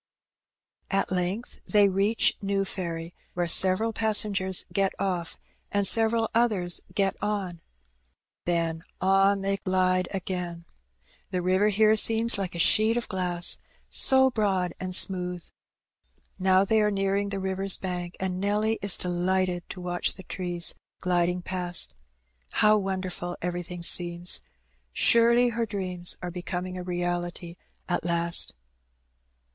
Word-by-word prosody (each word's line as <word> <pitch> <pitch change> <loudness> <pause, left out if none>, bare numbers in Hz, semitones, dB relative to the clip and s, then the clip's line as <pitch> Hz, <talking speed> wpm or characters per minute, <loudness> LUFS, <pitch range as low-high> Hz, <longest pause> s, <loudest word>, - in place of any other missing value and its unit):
At 195 -1 -1
length 185 +5 -3
they 205 -2 +4
reach 200 +4 +2
New 195 0 -1
Ferry, 170 -3 -6 0.2
where 175 -1 0
several 190 +6 +4
passengers 205 -4 +1
get 195 -1 +1
off 180 -4 -3 0.3
and 200 -1 +1
several 225 +2 +4
others 210 -7 +2
get 195 -2 +1
on; 195 -5 -3 0.8
then 165 -2 -1 0.2
on 195 +1 +3
they 195 0 0
glide 185 -1 0
again. 180 -3 -5 0.6
The 180 -2 -3
river 185 +3 +2
here 215 +1 +3
seems 225 0 +5
like 185 -3 -4
a - - -4
sheet 220 +6 +4
of 240 - -2
glass, 180 -2 +2 0.3
so 265 0 +5
broad 190 -6 0
and 185 -1 -3
smooth. 180 -2 0 0.9
Now 190 +1 +3
they 220 +2 +2
are 210 - +2
nearing 200 0 -1
the 200 - -4
river's 190 0 0
bank, 180 -1 -5
and 185 -1 -3
Nelly 210 +2 0
is 200 -2 +4
delighted 180 0 -1
to 185 - -8
watch 175 0 -2
the 190 - -11
trees 175 -2 -2 0.3
gliding 180 0 0
past. 180 -1 -3 0.6
How 215 0 +4
wonderful 185 -3 -4
everything 175 0 -5
seems! 175 - +1 0.5
Surely 235 - +4
her 230 -1 -2
dreams 180 -4 0
are 180 - -4
becoming 180 +1 -5
a 180 - -5
reality 175 -1 -4 0.3
at 175 - -1
last. 170 - +1
185 Hz, 130 wpm, -26 LUFS, 175-200 Hz, 0.9 s, seems